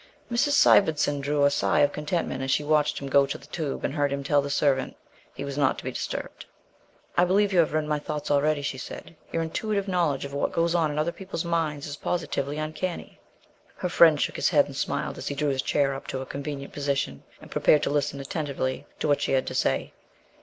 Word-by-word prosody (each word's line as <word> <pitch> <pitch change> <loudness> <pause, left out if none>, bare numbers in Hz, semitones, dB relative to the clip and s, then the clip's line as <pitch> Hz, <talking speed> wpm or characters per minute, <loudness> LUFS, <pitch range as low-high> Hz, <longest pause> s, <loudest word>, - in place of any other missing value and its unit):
Mrs. 240 +5 +2
Sivendson 155 - +4
drew 145 +1 +2
a 140 - +4
sigh 145 +1 +2
of 145 0 +3
contentment 150 -3 -2
as 135 - -3
she 150 - +2
watched 150 0 +2
him 140 - -5
go 140 0 +4
to 135 - -4
the - - -16
tube 155 -5 -4
and - - -2
heard 145 -2 +1
him 140 0 -2
tell 145 +1 +3
the 140 - -5
servant 140 -2 +1 0.4
he 140 - -5
was 140 0 -4
not 135 -2 +2
to - - -8
be - - -3
disturbed. - - -5 0.7
"I 175 - +5
believe 195 +2 +2
you 180 - +4
have 165 - +3
read 155 0 0
my 150 0 0
thoughts 150 0 -4
already," 145 0 +2
she 130 -2 -3
said; 165 - -9 0.2
"your 165 - 0
intuitive 200 +4 -2
knowledge 170 -8 0
of 140 - -8
what 140 - -1
goes 165 0 +1
on 165 -3 +2
in 150 - -4
other 155 +3 +1
people's 185 -2 -5
minds 160 -4 -1
is 145 -1 -6
positively 145 -4 -2
uncanny." 155 +3 -4 0.6
Her 180 - -3
friend 160 -3 +6
shook - - -1
his - - +2
head - - +4
and - - -10
smiled - - -2
as - - -6
he 140 - -2
drew 145 +1 0
his 135 -1 0
chair 140 0 +1
up 135 - -8
to 130 - -3
a - - -5
convenient 140 0 -6
position 140 - -2 0.2
and - - -14
prepared 150 0 +4
to - - 0
listen 145 -1 0
attentively 135 -2 -3
to - - +1
what 145 -1 +2
she - - 0
had 130 - +2
to - - -5
say. - - 0
145 Hz, 230 wpm, -26 LUFS, 140-160 Hz, 0.7 s, friend